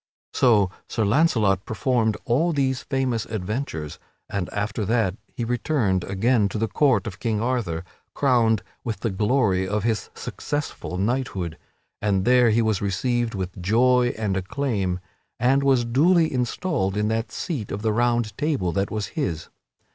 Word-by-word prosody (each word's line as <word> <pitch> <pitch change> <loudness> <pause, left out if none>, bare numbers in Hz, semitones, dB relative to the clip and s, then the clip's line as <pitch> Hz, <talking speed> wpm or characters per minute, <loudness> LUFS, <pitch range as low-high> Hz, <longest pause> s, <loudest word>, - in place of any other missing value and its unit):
So 105 -7 +4 0.2
Sir 110 - 0
Launcelot 105 - +3
performed 110 -2 0
all 160 +8 +2
these 130 -3 0
famous 130 -5 -1
adventures, 105 - -4 0.3
and 95 -3 -2
after 105 +1 -2
that 110 -3 +1 0.2
he 120 - -4
returned 115 - 0
again 105 +2 +2
to 110 - -4
the 110 +1 0
court 125 -6 +2
of 95 -2 -6
King 110 -3 -1
Arthur 110 -9 -1 0.3
crowned 115 -7 +3 0.2
with 110 -5 -4
the 115 - -1
glory 100 -2 +1
of 105 +1 -1
his 110 -2 -1
successful 145 -10 -4
knighthood, 100 -6 -1 0.5
and 100 -2 +1
there 125 -1 +5
he 115 +1 +3
was 110 -4 0
received 115 +4 0
with 95 -1 -5
joy 120 +5 +3
and 105 -3 -1
acclaim 95 -2 -1 0.4
and 130 +4 +3
was 135 -3 +3
duly 160 +7 +3
installed 125 - -1
in 105 0 +1
that 115 +1 -1
seat 140 - -4
of 100 +2 -4
the 110 -1 +1
Round 120 -2 +1
Table 145 - 0
that 95 +4 -1
was 105 -2 -3
his. 85 - -3
110 Hz, 155 wpm, -24 LUFS, 100-125 Hz, 0.5 s, there